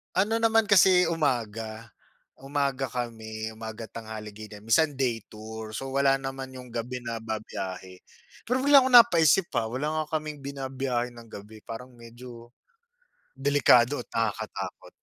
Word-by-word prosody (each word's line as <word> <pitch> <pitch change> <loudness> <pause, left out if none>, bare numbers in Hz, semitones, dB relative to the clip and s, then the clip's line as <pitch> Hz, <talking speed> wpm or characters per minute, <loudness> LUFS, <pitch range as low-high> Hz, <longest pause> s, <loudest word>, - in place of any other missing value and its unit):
ano 205 +4 +2
naman 225 -1 +3
kasi 185 -2 +6
umaga 115 -7 -2 0.5
umaga 135 -1 -1
kami, 110 -3 -5
umaga, 110 0 -7
tanghali 110 -1 -8
ganyan, 105 -1 -10
minsan 145 +8 +3
day 125 -4 0
tour. 110 0 -8
So, 135 +4 -5
wala 135 0 +4
naman 135 -1 -6
yung 125 -1 -9
gabi 125 +2 -4
na 115 -1 -4
bibiyahe. 95 -4 -6 0.4
Pero, 250 +2 0
bigla 280 -2 +7
akong 260 - 0
napaisip, 175 - +6
ah, 110 - +1
wala 155 +4 -1
nga 155 +1 -2
kaming 150 -2 -8
binabiyahe 130 -3 -3
ng 115 -1 -12
gabi, 105 +1 -11
parang 125 +2 -9
medyo 120 0 -12 0.9
delikado 135 -2 +4
at - - -36
nakakatakot. 115 -4 -3
125 Hz, 140 wpm, -27 LUFS, 110-145 Hz, 0.9 s, bigla